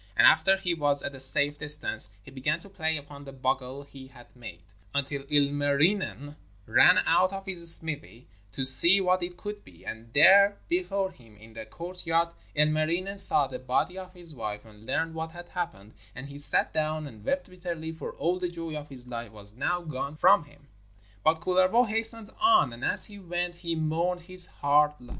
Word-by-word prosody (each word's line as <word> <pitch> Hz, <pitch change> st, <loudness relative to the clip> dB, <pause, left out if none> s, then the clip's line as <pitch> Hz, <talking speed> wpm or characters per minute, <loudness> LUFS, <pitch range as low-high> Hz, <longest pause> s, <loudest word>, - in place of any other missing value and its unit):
And -, -, +5 dB
after 195 Hz, 0 st, +4 dB
he 180 Hz, -2 st, -2 dB
was 145 Hz, -3 st, 0 dB
at 140 Hz, -, -5 dB
a 135 Hz, -, -11 dB
safe 145 Hz, +2 st, +3 dB
distance 145 Hz, -7 st, +3 dB
he 135 Hz, -, -14 dB
began 145 Hz, +5 st, -2 dB
to 200 Hz, -, -15 dB
play 160 Hz, -4 st, -3 dB
upon 145 Hz, 0 st, -12 dB
the 140 Hz, -, -11 dB
bugle 130 Hz, +1 st, -4 dB
he 135 Hz, -2 st, -14 dB
had 120 Hz, -2 st, -19 dB
made, 100 Hz, -8 st, -11 dB, 0.3 s
until 140 Hz, 0 st, -2 dB
Ilmarinen 145 Hz, +2 st, 0 dB, 0.3 s
ran 130 Hz, +10 st, +5 dB
out 185 Hz, +1 st, +2 dB
of 195 Hz, 0 st, -7 dB
his 170 Hz, -4 st, +6 dB
smithy 145 Hz, -6 st, -3 dB, 0.3 s
to 130 Hz, -, -2 dB
see 170 Hz, +9 st, +8 dB
who 185 Hz, -2 st, +1 dB
it 175 Hz, 0 st, -6 dB
could 210 Hz, +1 st, -8 dB
be, 85 Hz, -2 st, -19 dB
and 115 Hz, +1 st, -9 dB
there 200 Hz, +6 st, +6 dB
before 200 Hz, -, -2 dB
him 115 Hz, -, -20 dB
in 110 Hz, +2 st, -17 dB
the 110 Hz, -1 st, -9 dB
courtyard 170 Hz, +2 st, -3 dB, 0.3 s
Ilmarinen 155 Hz, +6 st, 0 dB
saw 145 Hz, -, +6 dB
the -, -, -8 dB
body 130 Hz, +8 st, -2 dB
of 185 Hz, -1 st, -10 dB
his 175 Hz, -3 st, -13 dB
wife 105 Hz, -5 st, -7 dB
and 110 Hz, 0 st, -18 dB
learned 165 Hz, 0 st, -2 dB
what 160 Hz, 0 st, -6 dB
had 175 Hz, 0 st, -12 dB
happened: 110 Hz, -, -6 dB, 0.2 s
and 140 Hz, +2 st, -9 dB
he 140 Hz, -, -10 dB
sat 145 Hz, -, +1 dB
down 155 Hz, 0 st, -2 dB
and 110 Hz, -7 st, -13 dB
wept 180 Hz, -, -2 dB
bitterly, 175 Hz, -3 st, -7 dB
for 160 Hz, -, -8 dB
all 180 Hz, +2 st, -2 dB
the 180 Hz, -1 st, -3 dB
joy 165 Hz, -2 st, -7 dB
of 150 Hz, -1 st, -8 dB
his 130 Hz, -3 st, -13 dB
life 120 Hz, -2 st, -8 dB
was 105 Hz, -1 st, -14 dB
now 175 Hz, +9 st, -2 dB
gone 145 Hz, -2 st, -6 dB
from 185 Hz, +1 st, +4 dB
him. 145 Hz, -1 st, -22 dB, 0.6 s
But 160 Hz, +1 st, +1 dB
Kullervo 185 Hz, +7 st, +2 dB
hastened 225 Hz, 0 st, 0 dB
on, 360 Hz, -, +3 dB
and 120 Hz, -, -11 dB
as -, -, +3 dB
he 205 Hz, -1 st, -9 dB
went 175 Hz, -1 st, -4 dB
he 170 Hz, -1 st, -5 dB
mourned 165 Hz, +3 st, -2 dB
his 180 Hz, 0 st, +2 dB
hard 150 Hz, +1 st, +1 dB
lot. 125 Hz, -1 st, -16 dB
155 Hz, 195 wpm, -26 LUFS, 135-180 Hz, 0.6 s, see